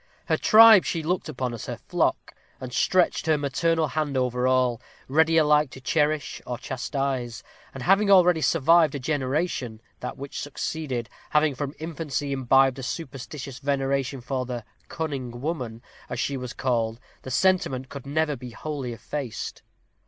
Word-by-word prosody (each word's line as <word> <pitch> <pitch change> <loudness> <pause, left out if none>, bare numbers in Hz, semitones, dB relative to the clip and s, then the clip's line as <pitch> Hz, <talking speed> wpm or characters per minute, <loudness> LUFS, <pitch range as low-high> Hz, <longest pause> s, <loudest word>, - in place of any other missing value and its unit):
Her - - +2
tribe 220 -3 +8
she 165 -2 -2
looked 175 0 -1
upon 125 -4 -3
as 115 - -7
her - - -4
flock, - - -1 0.3
and 125 -1 -7
stretched 180 +2 +2
her 155 -1 +4
maternal 160 +3 0
hand 145 -2 -1
over 125 0 +1
all, 125 -2 +2 0.3
ready 160 +4 +3
alike 150 -2 +4
to 130 - -11
cherish 150 +1 0
or 125 - -3
chastise; 130 -1 -3 0.3
and 130 - -7
having 195 +2 +4
already 180 -4 +6
survived 160 +3 +4
a - - -3
generation, 135 -3 -2 0.2
that - - -6
which 140 0 -6
succeeded, 145 -4 -4 0.2
having 150 -1 +3
from 140 +2 -5
infancy 155 -3 -4
imbibed 135 0 +3
a - - -5
superstitious 135 -1 -6
veneration 135 -1 -1
for 130 +1 -2
the 120 -3 -5 0.2
"cunning 135 -7 -4
woman," 125 -6 -4 0.3
as - - -4
she 140 - -1
was 125 -2 -5
called, 115 -3 -1 0.2
the - - -8
sentiment 135 -4 +1
could 140 0 -9
never 150 +1 0
be 125 -1 -9
wholly 135 0 -5
effaced. 120 +1 -5
140 Hz, 155 wpm, -25 LUFS, 125-155 Hz, 0.3 s, tribe